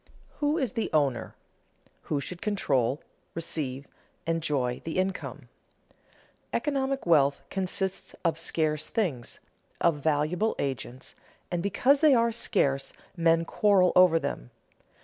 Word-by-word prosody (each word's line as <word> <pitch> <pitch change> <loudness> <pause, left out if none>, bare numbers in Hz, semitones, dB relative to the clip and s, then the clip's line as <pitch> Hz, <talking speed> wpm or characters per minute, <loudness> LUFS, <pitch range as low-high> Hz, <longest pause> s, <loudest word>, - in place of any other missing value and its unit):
_ - - -43 0.4
Who 295 +2 +1
is 265 - 0
the 225 - -1
owner, 140 -6 +1 0.7
who 145 - -1
should 175 +5 -7
control, 140 - 0 0.3
receive, 140 -5 -3 0.4
enjoy 150 -7 -1
the 160 - -4
income? 190 0 -3 1.0
Economic 275 -2 -1
wealth 145 -5 +3
consists 190 0 -3
of 165 -1 +1
scarce 155 -2 0
things, 160 - -2 0.4
of 165 -3 +3
valuable 155 +8 +1
agents, 130 -1 -4 0.4
and 175 -1 -1
because 255 +9 +3
they 305 -4 +6
are 230 0 +3
scarce, 140 - 0 0.2
men 165 -1 +3
quarrel 195 -1 +3
over 180 -2 +7
them. - - -4
165 Hz, 120 wpm, -28 LUFS, 145-200 Hz, 1.0 s, over